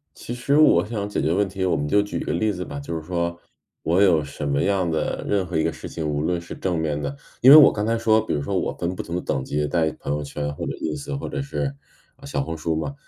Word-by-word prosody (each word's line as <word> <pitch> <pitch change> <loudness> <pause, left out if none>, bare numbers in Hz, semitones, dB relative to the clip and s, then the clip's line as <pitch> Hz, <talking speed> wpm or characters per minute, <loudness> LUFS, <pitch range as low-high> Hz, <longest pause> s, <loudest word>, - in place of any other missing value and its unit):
其 - - -7
实 125 +4 0
我 155 -7 +5
想 105 -2 -3
解 105 - -2
决 80 - +1
问 100 +2 +1
题， 95 0 -3
我 90 - +2
们 75 0 -2
就 100 +7 +4
举 105 0 -3
一 - - -4
个 - - -2
例 110 -1 +1
子 90 -1 -5
吧。 70 -3 -7
就 70 +4 -5
是 80 - -5
说 85 0 -2 0.5
我 85 +4 +2
有 90 -6 +5
什 75 0 -6
么 70 0 +1
样 95 -3 +1
的 80 -1 -2
任 100 -2 +1
何 90 -1 -4
一 80 - +1
个 80 - 0
事 - - -8
情， 80 -2 -4
无 75 0 -1
论 85 +2 0
是 85 - -8
正 90 -3 -2
面 75 -2 -1
的， 70 -1 -3 0.3
因 130 - +8
为 145 - +12
我 150 -3 +9
刚 105 - -2
才 115 +1 +1
说 110 -1 +4
比 - - -3
如 75 - 0
说 70 - -2
我 - - 0
分 85 +2 -3
不 - - -5
同 85 - -4
的 - - -1
等 65 - -2
级 75 +2 -1
在 80 0 +1
朋 70 - -3
友 75 0 -1
圈 75 0 -4
或 - - -5
者 - - -2
Ins 140 - -4
或 - - -5
者 145 - -3
是， 140 0 -3 0.4
呃， 135 - -19
小 140 - -2
红 80 - -4
书 80 +1 -2
嘛， 80 - -3
85 Hz, 325 characters per minute, -23 LUFS, 75-105 Hz, 0.5 s, 为